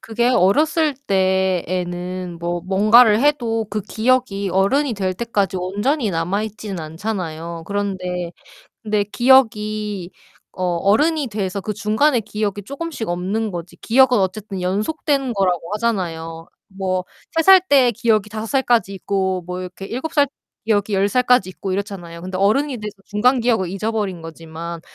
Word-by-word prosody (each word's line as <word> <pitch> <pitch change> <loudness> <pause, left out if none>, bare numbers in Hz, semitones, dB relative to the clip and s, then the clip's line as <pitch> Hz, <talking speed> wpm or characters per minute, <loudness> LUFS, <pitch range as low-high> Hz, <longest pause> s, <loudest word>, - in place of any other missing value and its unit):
그게 235 +2 0
어렸을 295 - +3
때에는 185 -2 -1
뭐 175 0 -2
뭔가를 215 +4 +5
해도 235 -7 +1
그 210 +1 -2
기억이 220 -2 0
어른이 235 +9 +2
될 190 -2 -2
때까지 200 -3 -1
온전히 205 +8 -1
남아 180 +4 -1
있지는 210 -3 -6
않잖아요. 165 -1 -5
그런데 180 -3 -3 0.5
근데 210 -2 0
기억이 215 -5 +2 0.4
어 185 - -4
어른이 275 - +2
돼서 200 -2 -3
그 210 - -3
중간의 225 +5 +2
기억이 210 -1 -3
쪼금씩 280 -1 -5
없는 190 +6 -1
거지 175 0 -7
기억은 260 +3 +4
어쨌든 195 +1 -3
연속된 265 - 0
거라고 180 -4 0
하잖아요. 170 -7 -3 0.2
뭐 185 -1 -2 0.3
3 325 - +4
살 380 +2 +8
때 260 -4 +5
기억이 215 -2 +1
5 220 0 -5
살까지 240 -6 +1
있고 190 -1 -1
뭐 180 0 -4
이렇게 180 +1 -8
7 260 +9 -4
살 290 -2 +4 0.4
기억이 205 -1 +1
10 195 +1 +2
살까지 250 -3 +3
있고 190 0 -5
이렇잖아요 185 -4 -5
근데 185 0 -4
어른이 250 +7 +2
돼서 210 -1 -6
중간 245 +5 +2
기억을 225 -7 +1
잊어버린 200 -3 -2
거지만. 165 +1 -8
205 Hz, 310 characters per minute, -20 LUFS, 185-235 Hz, 0.5 s, 살